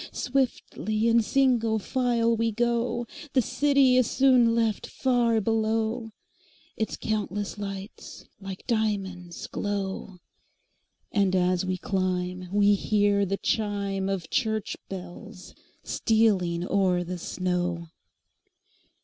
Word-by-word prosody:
Swiftly 240 Hz, -4 st, -1 dB
in 230 Hz, 0 st, +5 dB
single 235 Hz, -2 st, +2 dB
file 235 Hz, +1 st, +1 dB
we 230 Hz, 0 st, 0 dB
go, 235 Hz, +1 st, 0 dB, 0.3 s
The 260 Hz, -, +4 dB
city 275 Hz, 0 st, +3 dB
is 255 Hz, -2 st, +3 dB
soon 250 Hz, -3 st, +4 dB
left 225 Hz, -3 st, 0 dB
far 240 Hz, -3 st, +1 dB
below, 225 Hz, +1 st, 0 dB, 0.7 s
Its 220 Hz, -, -2 dB
countless 205 Hz, -1 st, -3 dB
lights 195 Hz, 0 st, -7 dB
like 195 Hz, -1 st, -8 dB
diamonds 195 Hz, -7 st, -2 dB
glow; 195 Hz, -2 st, -4 dB, 0.9 s
And 200 Hz, -4 st, +2 dB
as 180 Hz, 0 st, +1 dB
we 185 Hz, 0 st, -1 dB
climb 185 Hz, -1 st, -2 dB
we 205 Hz, 0 st, +4 dB
hear 205 Hz, 0 st, +2 dB
the 195 Hz, +2 st, -1 dB
chimeOf 195 Hz, -5 st, -1 dB
church 220 Hz, -4 st, 0 dB
bells 185 Hz, +1 st, -9 dB, 0.3 s
stealing 190 Hz, -6 st, +1 dB
o'er 185 Hz, -3 st, +2 dB
the 180 Hz, +1 st, -5 dB
snow. 175 Hz, -1 st, -2 dB
205 Hz, 105 wpm, -26 LUFS, 185-230 Hz, 0.9 s, in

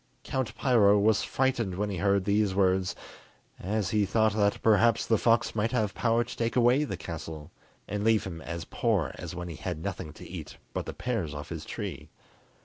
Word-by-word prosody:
Count 120 Hz, -4 st, -3 dB
Piro 110 Hz, -6 st, +5 dB
was 105 Hz, +1 st, +3 dB
frightened 120 Hz, -8 st, 0 dB
when 105 Hz, +2 st, -1 dB
he 95 Hz, -, -3 dB
heard 100 Hz, +1 st, +2 dB
these 100 Hz, -1 st, +2 dB
words, 95 Hz, -1 st, +2 dB, 0.6 s
as 100 Hz, 0 st, -1 dB
he 105 Hz, -1 st, +3 dB
thought 110 Hz, +1 st, +2 dB
that 105 Hz, -1 st, +2 dB
perhaps 110 Hz, 0 st, +4 dB
the 110 Hz, -3 st, +2 dB
fox 115 Hz, 0 st, +3 dB
might 110 Hz, +1 st, 0 dB
have 110 Hz, -5 st, 0 dB
power 115 Hz, 0 st, +2 dB
to -, -, -8 dB
take 115 Hz, 0 st, -1 dB
away 125 Hz, +3 st, +4 dB
the 150 Hz, -, -4 dB
castle, 80 Hz, -1 st, -7 dB, 0.4 s
and 105 Hz, +1 st, -3 dB
leave 110 Hz, -1 st, +3 dB
him 85 Hz, -4 st, -6 dB
as 85 Hz, 0 st, -5 dB
poor 105 Hz, -, 0 dB
as -, -, -6 dB
when 90 Hz, 0 st, -5 dB
he 85 Hz, -3 st, -7 dB
had -, -, -4 dB
nothing 95 Hz, -5 st, -4 dB
to -, -, -11 dB
eat -, -, -8 dB, 0.2 s
but -, -, -3 dB
the -, -, -4 dB
pears 100 Hz, -, -2 dB
off 75 Hz, 0 st, -7 dB
his -, -, -6 dB
tree. -, -, -6 dB
105 Hz, 200 wpm, -28 LUFS, 95-115 Hz, 0.6 s, Piro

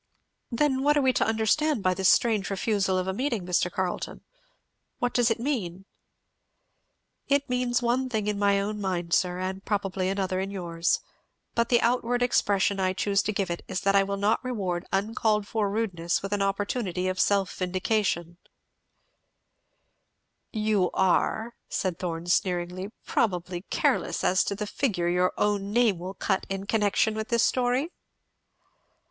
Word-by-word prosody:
"Then 265 Hz, +2 st, +1 dB
what 295 Hz, +2 st, +3 dB
are -, -, +4 dB
we 260 Hz, -1 st, +3 dB
to -, -, +2 dB
understand 225 Hz, +4 st, +1 dB
by 185 Hz, -, +3 dB
this 190 Hz, 0 st, +2 dB
strange 220 Hz, -4 st, +3 dB
refusal 195 Hz, -1 st, 0 dB
of 185 Hz, 0 st, -1 dB
a 190 Hz, -, -1 dB
meeting, 235 Hz, -4 st, -2 dB
Mr. 180 Hz, 0 st, +1 dB
Carleton? 185 Hz, -1 st, -3 dB, 0.8 s
what 245 Hz, 0 st, -1 dB
does 245 Hz, -1 st, +3 dB
it 225 Hz, -, 0 dB
mean?" 195 Hz, -9 st, -3 dB, 1.4 s
"It 280 Hz, 0 st, +2 dB
means 250 Hz, -1 st, 0 dB
one 255 Hz, +2 st, +1 dB
thing 220 Hz, -4 st, -1 dB
in 210 Hz, -1 st, -1 dB
my 200 Hz, -1 st, +3 dB
own 210 Hz, +1 st, -3 dB
mind, 175 Hz, -3 st, -2 dB
sir, 180 Hz, -1 st, +2 dB
and 190 Hz, +1 st, -4 dB
probably 195 Hz, -3 st, -1 dB
another 190 Hz, -1 st, -1 dB
in 190 Hz, +1 st, -2 dB
yours; 170 Hz, -3 st, -1 dB, 0.5 s
but 235 Hz, 0 st, +1 dB
the 240 Hz, -, +5 dB
outward 245 Hz, +1 st, +1 dB
expression 200 Hz, -4 st, +2 dB
I 185 Hz, -1 st, +1 dB
choose 200 Hz, +1 st, +1 dB
to -, -, -2 dB
give 195 Hz, -3 st, -2 dB
it 170 Hz, -, -4 dB
is 185 Hz, -1 st, -3 dB
that 195 Hz, 0 st, +2 dB
I 200 Hz, -, +6 dB
will 200 Hz, 0 st, -2 dB
not 205 Hz, +5 st, +1 dB
reward 190 Hz, -8 st, -3 dB
uncalled 210 Hz, +1 st, 0 dB
for 215 Hz, -2 st, 0 dB
rudeness 185 Hz, -6 st, -1 dB
with 200 Hz, +1 st, -3 dB
an 205 Hz, -, 0 dB
opportunity 195 Hz, -1 st, -1 dB
of 185 Hz, 0 st, -2 dB
self 200 Hz, -2 st, +2 dB
vindication." 185 Hz, -2 st, -1 dB, 2.1 s
"You 215 Hz, -4 st, +1 dB
are," 220 Hz, +5 st, +1 dB, 0.2 s
said 180 Hz, -3 st, -2 dB
Thorn 170 Hz, -2 st, -4 dB
sneeringly, 180 Hz, +1 st, 0 dB, 0.2 s
"probably 180 Hz, -4 st, -1 dB
careless -, -, 0 dB
as 185 Hz, -, +3 dB
to 200 Hz, -, -2 dB
the 210 Hz, +1 st, -3 dB
figure 200 Hz, -7 st, -1 dB
your 180 Hz, +1 st, +2 dB
own 205 Hz, -1 st, 0 dB
name 220 Hz, -5 st, +3 dB
will 185 Hz, +3 st, -6 dB
cut 190 Hz, -2 st, -1 dB
in 195 Hz, 0 st, -3 dB
connection 210 Hz, +1 st, +2 dB
with 220 Hz, 0 st, -4 dB
this 235 Hz, -1 st, +2 dB
story?" 255 Hz, +6 st, +1 dB
200 Hz, 160 wpm, -27 LUFS, 185-225 Hz, 2.1 s, I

